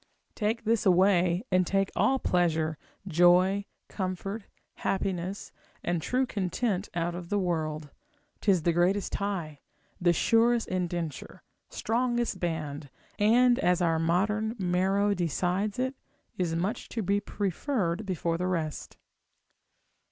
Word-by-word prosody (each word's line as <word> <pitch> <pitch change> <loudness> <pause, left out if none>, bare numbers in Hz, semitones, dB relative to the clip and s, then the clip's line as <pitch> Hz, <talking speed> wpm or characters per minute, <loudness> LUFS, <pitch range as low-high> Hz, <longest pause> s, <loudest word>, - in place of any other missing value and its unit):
Take 220 +2 -1
this 225 0 +1
away, 180 -1 +3
and 185 -1 +3
take 195 0 +1
all 265 - +3
pleasure, 160 - 0 0.3
joy, 180 +3 +4 0.2
comfort, 195 +2 -4 0.3
happiness, 190 0 -2 0.3
and 175 -1 -1
true 255 +9 +1
content 200 -1 -2
out 170 0 -1
of 175 0 -7
the 205 - +1
world; 155 -5 -2 0.5
'tis 190 -6 +2
the 170 - +2
greatest 180 +3 +1
tie, 175 -8 -3 0.4
the 175 -1 +4
surest 230 +6 +3
indenture, 175 -5 -4 0.3
strongest 240 -2 -1
band, 155 -4 -3 0.3
and, 240 +4 +5
as 180 0 +2
our 165 -2 +2
modern 210 +7 +1
Maro 195 +2 +1
decides 180 +3 -1
it, 260 +1 -1 0.4
is 170 -3 -1
much 185 +6 -2
to 225 - -3
be 200 +2 +2
preferred 205 - -2
before 170 -4 -2
the 180 - 0
rest. 165 -4 -3
185 Hz, 120 wpm, -28 LUFS, 170-205 Hz, 0.5 s, and